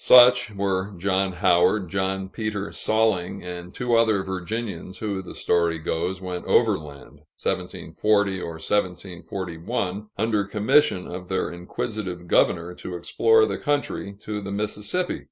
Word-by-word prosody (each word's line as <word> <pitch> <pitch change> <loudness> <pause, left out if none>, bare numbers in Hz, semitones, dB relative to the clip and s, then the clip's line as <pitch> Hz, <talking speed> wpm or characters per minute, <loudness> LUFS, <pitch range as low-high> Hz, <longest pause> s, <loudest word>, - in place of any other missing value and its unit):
Such 125 -4 +7
were 100 0 -1
John 95 +1 +1
Howard, 90 +2 +3
John 95 +1 -1
Peter 105 0 -4
Salling, 100 -4 +1
and 90 0 -6
two 120 +3 -2
other 110 -4 +3
Virginians 95 0 -4
who, 100 -3 -3
the 95 - -10
story 85 -1 +1
goes, 85 +3 -2
went 90 -1 -5
overland 70 -2 0 0.2
(1740 100 -3 0
or 85 - -5
1741) 90 +2 -3
under 105 -1 +1
commission 105 0 +2
of 90 0 -7
their 95 0 -1
inquisitive 90 0 -5
governor, 85 +1 +2
to 90 0 -7
explore 445 - +4
the - - -3
country 145 -8 -1
to 105 -1 -4
the 100 0 -6
Mississippi. 105 - -1
95 Hz, 130 wpm, -24 LUFS, 90-105 Hz, 0.2 s, Such